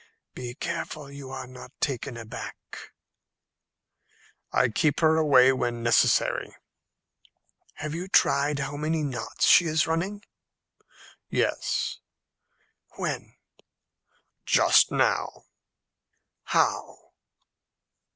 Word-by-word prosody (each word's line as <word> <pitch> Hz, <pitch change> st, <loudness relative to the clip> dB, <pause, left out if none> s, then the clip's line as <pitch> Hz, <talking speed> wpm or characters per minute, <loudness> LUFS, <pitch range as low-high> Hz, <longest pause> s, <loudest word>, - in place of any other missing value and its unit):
"Be 125 Hz, -1 st, -7 dB
careful 145 Hz, -1 st, -5 dB
you 140 Hz, -1 st, -9 dB
are 130 Hz, 0 st, -6 dB
not 125 Hz, +1 st, -13 dB
taken 135 Hz, -2 st, -3 dB
aback." 115 Hz, -1 st, -8 dB, 1.9 s
"I 125 Hz, -, +2 dB
keep 145 Hz, +6 st, +1 dB
her 160 Hz, -1 st, +4 dB
away 135 Hz, -5 st, +5 dB
when 120 Hz, -2 st, -2 dB
necessary." 120 Hz, -, +2 dB, 1.2 s
"Have 150 Hz, 0 st, -5 dB
you 175 Hz, +3 st, -5 dB
tried 145 Hz, -5 st, +2 dB
how 145 Hz, +1 st, -4 dB
many 155 Hz, +1 st, -1 dB
knots 125 Hz, -6 st, -2 dB
she 175 Hz, -, +6 dB
is 155 Hz, -1 st, +1 dB
running?" 190 Hz, +6 st, -2 dB, 1.1 s
"Yes." -, -, -1 dB, 1.0 s
"When?" -, -, -4 dB, 1.1 s
"Just -, -, +4 dB
now." -, -, 0 dB, 1.0 s
"How?" -, -, -1 dB
140 Hz, 90 wpm, -26 LUFS, 125-155 Hz, 1.9 s, she